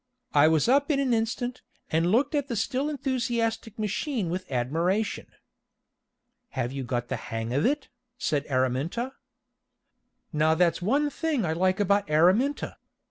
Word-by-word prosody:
I 145 +1 +6
was 160 +2 +3
up 280 +4 +3
in 285 -3 +2
an 265 -3 +2
instant, 240 +2 -1 0.3
and 165 +2 +2
looked 255 +9 +2
at 285 -2 0
the 240 - -3
still 265 +6 -1
enthusiastic 235 -6 -1
machine 215 - -2
with 185 -3 -4
admiration. 170 - 0 1.3
"Have 125 -1 -1
you 135 0 -4
got 120 -1 -2
the 130 - -1
hang 115 +1 -4
of 145 - +2
it?" 290 +1 -1 0.3
said 150 - -1
Araminta. 135 - 0 1.2
Now 155 +1 +3
that's 170 0 +2
one 285 +10 +1
thing 300 - -1
I 160 - 0
like 185 +3 +1
about 200 0 +2
Araminta. 185 - +2
200 Hz, 145 wpm, -27 LUFS, 155-255 Hz, 1.3 s, I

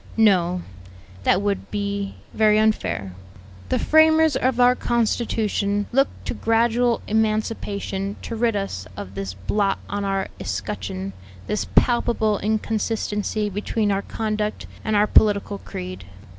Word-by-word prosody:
"No; 180 -5 +3 0.6
that 190 +2 +3
would 205 -1 -1
be 200 -1 -3 0.2
very 215 -1 +4
unfair. 215 - 0 0.6
The - - +2
framers 315 -1 +5
of 255 -1 +1
our 250 0 +6
constitution 215 -4 0
looked 270 +3 +1
to - - -2
gradual 235 +1 +2
emancipation 210 -2 -1
to 230 - -4
rid 230 -1 +1
us 195 - -3
of 95 -1 -7
this 95 -1 -5
blot 195 - 0
on 205 0 -3
our 195 -1 -1
escutcheon, 95 0 -4 0.3
this 210 - -2
palpable 230 -3 +3
inconsistency 215 0 -1
between 205 +1 -1
our 195 0 +1
conduct 215 0 -3 0.2
and 215 - 0
our 205 +1 +5
political 205 -1 +3
creed. 90 +1 -7
210 Hz, 125 wpm, -23 LUFS, 195-225 Hz, 0.6 s, our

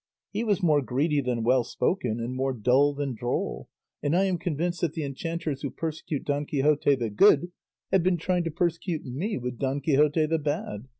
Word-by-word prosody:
He 210 +3 -2
was 205 -4 0
more 150 -4 +4
greedy 145 +3 0
than 125 -3 -1
well 125 +1 +3
spoken, 120 - -1
and 120 +2 -3
more 135 +1 -1
dull 130 +5 +3
than 140 -2 -2
droll; 120 +2 -3 0.3
and 145 +3 +1
I 190 - +4
am 185 -3 0
convinced 175 +1 -2
that 165 -3 0
the 160 - -3
enchanters 150 +1 -4
who 140 - -2
persecute 155 -2 -4
Don 145 0 -1
Quixote 145 0 +2
the 115 -4 -3
Good 175 - +5 0.4
have 190 - +4
been 180 0 +2
trying 180 +1 0
to - - 0
persecute 170 0 -2
me 150 - -3
with 125 -1 -5
Don 135 +1 0
Quixote 150 +2 +3
the 160 +1 0
Bad. 145 -6 -3
145 Hz, 195 wpm, -27 LUFS, 130-170 Hz, 0.4 s, Good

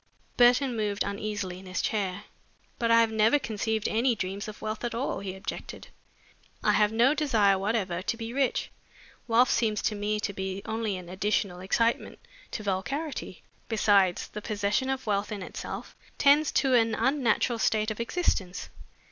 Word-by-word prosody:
Burton 245 +1 +4
moved 210 -2 -1
uneasily 200 -2 -4
in 190 - -13
his 185 - -3
chair. 200 -2 -1 0.6
"But 230 - +1
I 230 0 +6
have 225 -1 +2
never 220 +5 +4
conceived 220 -4 -2
any 235 +2 +2
dreams 195 +1 -4
of 215 - -8
wealth 215 +1 -4
at 240 -1 -2
all," 255 +4 -2
he 190 -1 -5
objected. 190 - -7 0.7
"I - - +4
have 210 0 +3
no 235 +5 +4
desire 225 -11 +3
whatever 195 -4 -1
to 230 +4 -2
be 230 0 -6
rich. 270 -1 0 0.6
Wealth 240 +2 +4
seems 215 -3 +1
to - - +1
me 210 +1 -1
to 200 - -2
be 190 0 -4
only 220 -3 -2
an 180 -1 -9
additional 190 0 -1
excitement 230 +5 0 0.3
to 215 - -5
vulgarity. 270 +11 -3 0.3
Besides, 200 -5 +3
the 210 - -7
possession 210 +5 -1
of 265 -1 -2
wealth 205 -1 -1
in 205 -3 -4
itself - - -7 0.2
tends 290 +1 +5
to 265 -2 +2
an 225 -2 +4
unnatural 240 -2 +1
state 215 0 +1
of 215 - -6
existence. 230 - -1
215 Hz, 165 wpm, -28 LUFS, 200-235 Hz, 0.7 s, I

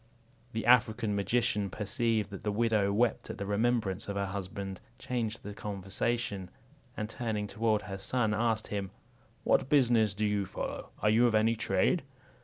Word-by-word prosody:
The 110 0 -2
African 110 -3 +4
magician 105 0 +1
perceiving 110 +1 -1
that 95 - -7
the 105 - -1
widow 105 -2 +2
wept 115 +3 +1
at - - -5
the 100 - -4
remembrance 105 -1 0
of 100 - -3
her 100 0 0
husband, 95 0 -5 0.2
changed 120 -4 -3
the 105 - -6
conversation, 100 0 -2 0.5
and 105 - -2
turning 110 -3 -2
toward 110 0 0
her 95 0 -6
son, 110 +1 +1
asked 110 0 +1
him, 100 -2 -3 0.5
"What - - +2
business 120 -8 +4
do 105 +1 0
you 105 -2 0
follow? - - -5
Are 105 - +5
you 120 +3 +5
of 115 - +1
any 110 +2 +3
trade?" - - +2
105 Hz, 165 wpm, -31 LUFS, 100-115 Hz, 0.5 s, Are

